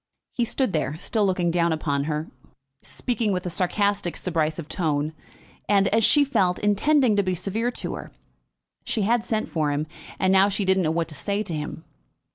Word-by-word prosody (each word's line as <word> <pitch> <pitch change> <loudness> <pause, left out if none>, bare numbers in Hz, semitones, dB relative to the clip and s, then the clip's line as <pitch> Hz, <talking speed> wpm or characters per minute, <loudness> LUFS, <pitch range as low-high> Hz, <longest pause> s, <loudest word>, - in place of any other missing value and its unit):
He 240 - +1
stood 255 -2 0
there, 155 -1 -1
still 210 +4 0
looking 180 -2 +1
down 170 0 +2
upon 145 -3 -1
her, 155 0 -3 0.5
speaking 235 -4 -2
with 180 -1 -2
a 180 - -3
sarcastic 195 +1 0
subrisive 160 -2 -1
tone, 155 -3 -1 0.6
and, 200 -1 +4
as 225 +2 +2
she 290 +6 +5
felt, 185 -10 +1
intending 230 +4 +3
to - - +5
be 185 -2 -1
severe 205 +7 -1
to 245 - -4
her. - - -8 0.7
She 215 - -1
had 230 +2 +2
sent 220 -2 -1
for 155 -3 -1
him, 145 +1 -1 0.3
and 190 0 +2
now 195 +1 +5
she 200 0 -1
didn't 190 0 +3
know 160 - +1
what 165 0 0
to - - -8
say 200 +10 -2
to 180 - -6
him. 155 +1 -5
185 Hz, 190 wpm, -24 LUFS, 160-210 Hz, 0.7 s, she